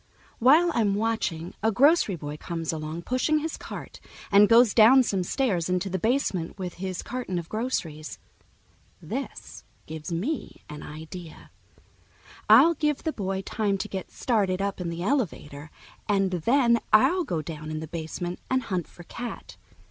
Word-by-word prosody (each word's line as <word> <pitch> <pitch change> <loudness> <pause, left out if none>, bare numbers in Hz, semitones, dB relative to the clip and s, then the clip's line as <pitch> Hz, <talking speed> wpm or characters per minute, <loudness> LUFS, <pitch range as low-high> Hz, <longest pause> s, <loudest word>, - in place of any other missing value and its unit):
While 310 +8 +5
I'm 210 -6 +2
watching, 205 -6 -2
a 220 +2 +2
grocery 275 - +4
boy 145 -2 -6
comes 165 0 -4
along 155 +2 -5
pushing 255 - +1
his 315 +1 -3
cart - - -9 0.3
and 205 +1 +6
goes 230 -1 +6
down 245 +4 +7
some 195 -5 -1
stairs 180 -4 0
into 180 +1 -1
the 190 - -1
basement 210 -7 -1
with 180 -3 -5
his 185 -2 -4
carton 245 -8 -4
of 170 -1 -4
groceries. 170 -10 -3 0.8
This - - -7 0.2
gives 155 +1 -7
me 220 - -3
an 150 0 -8
idea. 160 +2 -10 1.0
I'll 265 +11 +8
give 300 -2 -1
the 315 - -1
boy 195 -1 -3
time 205 0 -1
to 190 - -4
get 190 -1 -6
started 200 -6 0
up 200 -1 -2
in 175 - -3
the 170 +1 -4
elevator, 160 - -2 0.4
and 195 -2 +2
then 235 - +3
I'll 350 +12 +5
go 165 - -3
down 155 0 -7
in 155 0 -3
the 160 - -5
basement 170 +2 -5
and 260 0 +1
hunt 180 -5 -3
for 175 - -14
Cat. 235 +6 -7
195 Hz, 160 wpm, -26 LUFS, 170-245 Hz, 1.0 s, I'll